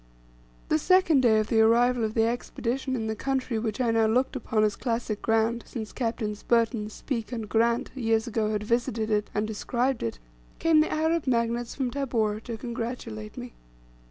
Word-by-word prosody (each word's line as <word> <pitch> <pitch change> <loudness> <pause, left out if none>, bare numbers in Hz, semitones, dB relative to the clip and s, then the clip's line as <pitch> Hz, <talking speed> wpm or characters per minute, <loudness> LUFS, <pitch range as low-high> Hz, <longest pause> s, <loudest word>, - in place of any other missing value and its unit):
The - - +3
second 355 - +4
day 225 -3 +4
of 215 0 0
the 225 -1 +4
arrival 240 +2 +4
of 215 0 -2
the 225 - +4
Expedition 245 +2 -2
in 225 -3 -2
the 220 0 -2
country 260 -1 -1
which 220 +1 -3
I 240 -3 +2
now 225 -1 +3
looked 255 +5 +1
upon 225 -3 0
as 210 -1 +2
classic 230 -3 -2
ground, 225 +1 +1
since 220 -4 -6
Capts. 225 -4 -3
Burton, 230 -2 +1
Speke, 230 +1 -4
and 225 -3 -4
Grant 235 +4 +1
years 225 -3 +1
ago 220 -3 -1
had 210 -1 -1
visited 225 -1 0
it, 210 0 +1
and 210 0 +1
described 240 +4 -1
it, 115 - -3 0.4
came 325 -2 +4
the 310 - +2
Arab 320 0 0
magnates 235 -1 0
from 260 -3 -1
Tabora 225 -6 -1
to 230 -2 -5
congratulate 230 - -5
me. - - -7
230 Hz, 185 wpm, -27 LUFS, 220-250 Hz, 0.4 s, second